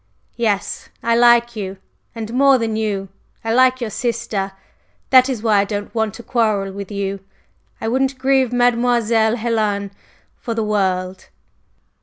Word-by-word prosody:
Yes, 215 -4 -1
I 230 0 +2
like 235 0 +4
you 195 -2 -5 0.4
and 225 0 -6
more 275 +1 +5
than 225 -2 -2
you, 205 -3 -2 0.3
I 225 0 -1
like 255 +1 +4
your 225 -3 -3
sister. 215 -4 -2 0.6
That 260 0 +6
is 240 -5 -3
why 215 -3 +3
I - - +3
don't 205 0 -5
want 220 -3 -1
to 235 - -10
quarrel 215 -6 0
with 200 0 -7
you; 200 -1 -3 0.6
I - - -4
wouldn't 265 +3 0
grieve 265 -1 +2
Mademoiselle 235 -2 +2
Helen 215 -4 -1 0.5
for 230 -3 -5
the 225 - 0
world." 190 -3 -1
225 Hz, 150 wpm, -19 LUFS, 205-240 Hz, 0.6 s, That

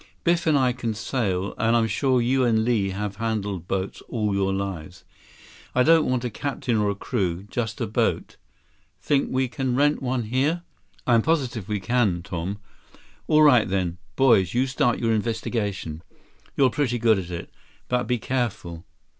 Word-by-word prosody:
Biff 170 -1 +1
and 155 -2 +4
I 130 -2 +2
can 120 -3 -3
sail, 100 -5 -2
and 115 +1 +3
I'm 115 -1 +3
sure 125 +4 +1
you 130 +2 +2
and 110 -2 +2
Li 110 -5 +1
have 100 +1 -4
handled 105 -6 -3
boats 95 0 -3
all 105 -4 -1
your 95 0 +1
lives. 90 -4 -5 0.7
I 125 - +5
don't 165 0 +4
want 125 -1 0
a 120 - -2
captain 135 -1 -2
or 105 -1 +1
a 100 - -1
crew. 95 -5 -2
Just 115 -4 -3
a - - 0
boat. - - -1 0.6
Think 140 -2 +1
we 130 0 0
can 130 0 -2
rent 145 +2 +2
one 125 -2 -1
here?" 140 +10 0 0.4
"I'm 120 -2 +4
positive 130 - -1
we 105 -1 -1
can, 95 -4 +1
Tom." 95 +1 -4 0.7
"All 155 0 +5
right 125 -9 +5
then. 90 -2 -1 0.2
Boys, 115 -8 +4
you 125 +2 +3
start 130 -2 +1
your 115 -1 +1
investigation. 105 -7 -2 0.6
You're 130 -3 +4
pretty 130 -4 0
good 110 -3 +3
at 90 -2 -6
it. 85 -1 -6 0.4
But 125 0 0
be 125 - +1
careful. 100 -9 -3
115 Hz, 170 wpm, -24 LUFS, 100-130 Hz, 0.7 s, I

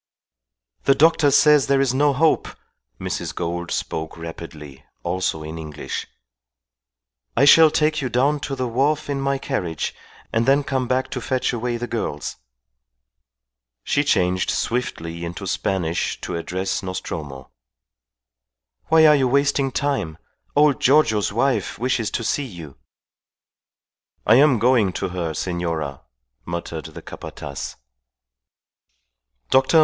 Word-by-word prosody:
"The 135 - +5
doctor 155 0 +4
says 150 0 +5
there 140 -1 +3
is 135 -2 +2
no 145 +2 +3
hope," 155 +4 +2 0.5
Mrs. - - -4
Gould 85 0 -3
spoke 80 +1 -3
rapidly, 80 -4 -9 0.2
also 85 -3 -1
in 80 +1 -7
English. 75 -2 -6 1.3
"I - - +5
shall 160 +2 +8
take 155 0 +1
you 130 - -2
down 140 +5 +2
to 140 0 -4
the 130 -1 -2
wharf 145 +5 0
in 140 -1 -2
my 135 0 0
carriage 90 - -3 0.4
and 115 +2 +1
then 140 +2 +4
come 130 -2 -1
back 130 +1 0
to 125 - -3
fetch 130 +1 -1
away 120 0 -2
the 120 - -3
girls." 110 -11 -4 1.5
She 145 - +1
changed 90 -9 +1
swiftly 85 -9 -2
into 85 +4 -5
Spanish 90 -3 -1
to 90 - -4
address 90 +3 -2
Nostromo. 75 -8 -6 1.4
"Why 160 -1 +6
are 150 -1 +7
you 135 -3 +2
wasting 140 +1 +2
time? 135 - -1 0.4
Old 145 -2 +4
Giorgio's 125 -8 +3
wife 130 +5 0
wishes 120 -3 0
to - - -3
see 140 +5 0
you." 85 - -10 1.5
"I 110 - +6
am 140 -2 +5
going 115 -4 +3
to 95 - -3
her, 85 -3 -3
senora," 85 -6 -3 0.4
muttered 85 -2 -5
the - - -10
Capataz. 70 0 -7 1.8
Dr. 135 +5 +5
120 Hz, 130 wpm, -22 LUFS, 85-140 Hz, 1.8 s, shall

